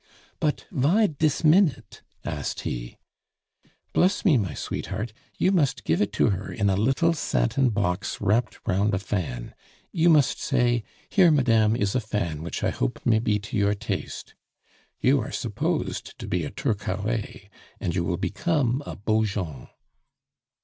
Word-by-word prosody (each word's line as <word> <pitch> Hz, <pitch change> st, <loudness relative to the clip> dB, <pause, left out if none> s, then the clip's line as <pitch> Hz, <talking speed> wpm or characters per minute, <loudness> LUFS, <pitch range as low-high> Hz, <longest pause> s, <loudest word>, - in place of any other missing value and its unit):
"But 150 Hz, -1 st, -1 dB
vy 170 Hz, -, +3 dB
dis 155 Hz, -4 st, 0 dB
minute?" 160 Hz, 0 st, +3 dB, 0.2 s
asked -, -, -3 dB
he. -, -, -5 dB, 1.0 s
"Bless 190 Hz, +4 st, +2 dB
me, 170 Hz, -7 st, +6 dB
my 95 Hz, -, 0 dB
sweetheart, 110 Hz, +1 st, -4 dB, 0.2 s
you 185 Hz, -, +3 dB
must 140 Hz, -, +1 dB
give 80 Hz, -2 st, +1 dB
it 105 Hz, -, +1 dB
to 110 Hz, -, +3 dB
her 100 Hz, +1 st, -4 dB
in 100 Hz, -1 st, +1 dB
a -, -, +2 dB
little 135 Hz, -, +2 dB
satin 130 Hz, -, +1 dB
box 95 Hz, -2 st, -1 dB
wrapped 110 Hz, +2 st, 0 dB
round 100 Hz, +2 st, +2 dB
a -, -, +1 dB
fan. 85 Hz, -11 st, -4 dB, 0.4 s
You 170 Hz, 0 st, +3 dB
must 150 Hz, -4 st, +4 dB
say, 120 Hz, -2 st, +1 dB, 0.2 s
'Here, 185 Hz, -4 st, +5 dB
madame, 115 Hz, -7 st, +3 dB
is 100 Hz, -3 st, 0 dB
a 130 Hz, -, +2 dB
fan 100 Hz, -9 st, -3 dB
which 85 Hz, -, -5 dB
I -, -, +2 dB
hope -, -, -3 dB
may 110 Hz, -2 st, +4 dB
be 110 Hz, -2 st, +1 dB
to 105 Hz, -, -7 dB
your 100 Hz, 0 st, +2 dB
taste.' 100 Hz, -, -5 dB, 0.7 s
You -, -, +3 dB
are -, -, -5 dB
supposed -, -, -2 dB
to -, -, -7 dB
be -, -, -1 dB
a -, -, -4 dB
Turcaret, 105 Hz, 0 st, -3 dB, 0.3 s
and 85 Hz, -, -2 dB
you 90 Hz, -1 st, 0 dB
will 85 Hz, +1 st, -1 dB
become 125 Hz, -, 0 dB
a -, -, -5 dB
Beaujon." 100 Hz, -, -1 dB
110 Hz, 155 wpm, -25 LUFS, 95-140 Hz, 1.0 s, me